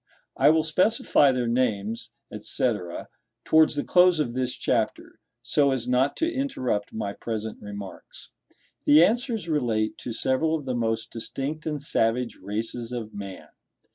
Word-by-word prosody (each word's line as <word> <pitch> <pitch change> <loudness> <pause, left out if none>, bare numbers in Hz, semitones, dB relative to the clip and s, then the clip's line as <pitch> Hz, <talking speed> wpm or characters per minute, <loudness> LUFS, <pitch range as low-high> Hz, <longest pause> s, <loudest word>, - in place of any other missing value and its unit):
I 140 - +5
will 160 0 +4
specify 160 -3 +3
their 125 -2 -1
names, 115 -3 -1 0.3
&c., 125 - 0 0.7
towards 160 -1 +5
the 145 - -1
close 180 -2 +5
of 120 -6 -1
this 125 0 -1
chapter, - - -2 0.2
so 140 +3 +3
as 130 -3 -1
not 125 +3 +2
to 330 +1 0
interrupt 130 - -2
my 100 -2 -4
present 110 -1 -5
remarks. 100 -1 -9 0.6
The 150 +3 +7
answers 230 -3 -1
relate 120 -9 0
to 120 - -5
several 130 +7 +1
of 150 -3 -5
the 130 - -2
most 115 -2 -1
distinct 140 +7 -4
and 150 -2 -3
savage 120 -3 0
races 115 +4 -4
of 115 -3 -5
man. 100 -2 -8
125 Hz, 145 wpm, -26 LUFS, 115-155 Hz, 0.7 s, The